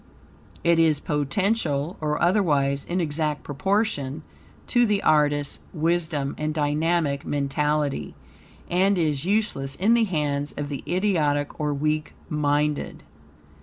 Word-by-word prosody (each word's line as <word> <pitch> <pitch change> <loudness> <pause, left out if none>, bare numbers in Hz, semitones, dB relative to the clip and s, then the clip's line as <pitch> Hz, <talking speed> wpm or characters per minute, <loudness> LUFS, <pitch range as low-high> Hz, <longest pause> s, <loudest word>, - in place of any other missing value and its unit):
It 170 -1 +4
is 160 -3 +4
potential 160 0 0
or 150 -1 -1
otherwise, 145 -7 +2
in 180 +2 -2
exact 150 -2 -1
proportion 155 - -1 0.4
to 240 -1 +3
the 205 -1 +1
artist's 145 -2 +2
wisdom 160 -4 0
and 155 0 -2
dynamic 150 -1 0
mentality, 145 0 -1 0.5
and 190 +2 +2
is 155 -3 0
useless 190 -10 0
in 210 +5 +3
the 235 -1 +4
hands 145 -5 -2
of 145 0 -3
the 140 - -4
idiotic 155 -6 0
or 150 -1 0
weak 155 +2 -1
minded. 150 0 0
150 Hz, 120 wpm, -24 LUFS, 145-175 Hz, 0.5 s, It